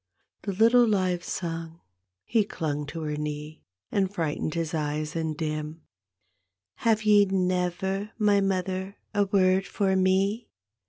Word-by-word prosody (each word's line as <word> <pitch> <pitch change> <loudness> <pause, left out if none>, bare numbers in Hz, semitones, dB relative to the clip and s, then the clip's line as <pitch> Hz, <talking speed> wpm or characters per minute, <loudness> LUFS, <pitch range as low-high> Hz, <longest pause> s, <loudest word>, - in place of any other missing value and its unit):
The 200 - -3
little 230 +4 +5
live 185 -4 +1
son 165 -1 -5 0.5
he 225 -2 +2
clung 150 -7 -3
to 165 +2 -6
her 150 -1 -2
knee 150 0 -5 0.2
— 90 - -54
And 195 -2 +1
frightened 160 -4 -2
his 165 -1 -2
eyes 150 0 -2
and 160 -2 -2
dim 155 0 -4 0.3
— 90 +2 -49
" 90 - -57 0.2
Have 220 -1 +2
ye 210 -1 +6
never,, 190 +1 -1
my 205 -2 +3
mother, 190 0 -2 0.2
a 205 -1 +3
word 190 -1 +3
for 195 -2 +1
me? 195 +4 +1
185 Hz, 150 wpm, -27 LUFS, 155-200 Hz, 0.5 s, ye